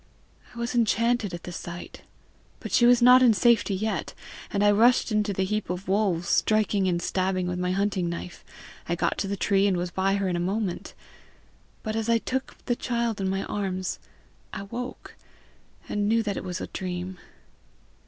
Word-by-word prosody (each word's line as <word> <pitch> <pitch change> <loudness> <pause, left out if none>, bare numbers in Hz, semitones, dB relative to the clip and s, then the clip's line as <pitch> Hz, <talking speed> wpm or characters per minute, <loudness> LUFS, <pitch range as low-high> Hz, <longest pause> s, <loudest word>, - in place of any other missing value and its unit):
I - - -11
was 235 +1 -3
enchanted 230 -2 +2
at 175 - -7
the 180 - -7
sight. 175 0 -8 0.6
But - - -7
she 240 - +5
was 245 0 +5
not 250 +1 +8
in 240 -4 +6
safety 220 -1 +3
yet, 215 +3 -3 0.4
and 200 0 +1
I 205 - +6
rushed 235 +3 +4
into 210 -1 +1
the 190 -1 -1
heap 215 +3 -2
of 180 +2 -4
wolves, 190 -4 +1
striking 210 -3 +2
and 175 -2 +1
stabbing 185 +1 -1
with 180 0 -3
my 180 0 -1
hunting 190 -2 0
knife. 170 +1 -7 0.5
I 170 - +1
got - - -1
to 200 - -1
the 200 +1 -3
tree, 200 0 +2
and 190 -3 +1
was 175 0 -3
by 195 +2 +1
her 200 -1 0
in 180 - -1
a - - -1
moment. 190 +1 -3 0.9
But 215 -1 -3
as 225 0 -2
I 230 - +5
took 260 +3 -4
the 240 - +1
child 235 -4 -2
in 190 - 0
my 195 +1 -1
arms 190 -2 -3 0.5
I - - -5
woke, 240 +5 -7 0.7
and 205 0 -1
knew 225 0 +3
that 205 -2 -2
it - - -5
was 180 0 -4
a - - -4
dream. 180 0 -5
200 Hz, 195 wpm, -26 LUFS, 185-225 Hz, 0.9 s, not